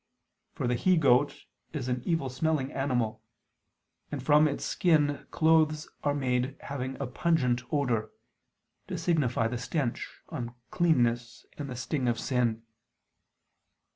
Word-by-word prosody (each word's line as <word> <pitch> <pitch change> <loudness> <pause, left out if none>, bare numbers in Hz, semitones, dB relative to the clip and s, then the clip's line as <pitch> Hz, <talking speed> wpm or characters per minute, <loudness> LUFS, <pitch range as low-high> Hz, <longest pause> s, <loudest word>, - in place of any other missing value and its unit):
For - - -3
the 125 - +2
he 180 +9 +3
goat 140 -1 +3 0.3
is 140 -5 -3
an 125 0 -1
evil 165 -5 +1
smelling 140 +1 0
animal; 125 -5 -1 0.9
and 140 -3 -4
from 150 +2 +5
its 140 - -3
skin 150 -5 +2
clothes 160 -1 +3 0.2
are 145 -1 +1
made 130 0 0
having 130 -1 -5
a 140 - -1
pungent 125 -2 +1
odor; 120 -7 0 0.8
to - - -4
signify 130 -9 +1
the 120 +1 -3
stench, 130 -1 -2 0.2
uncleanness 120 -1 0
and 145 -2 -6
the 125 - -5
sting 130 +1 -2
of 120 -1 +1
sin. 120 -4 0
130 Hz, 130 wpm, -29 LUFS, 120-150 Hz, 0.9 s, from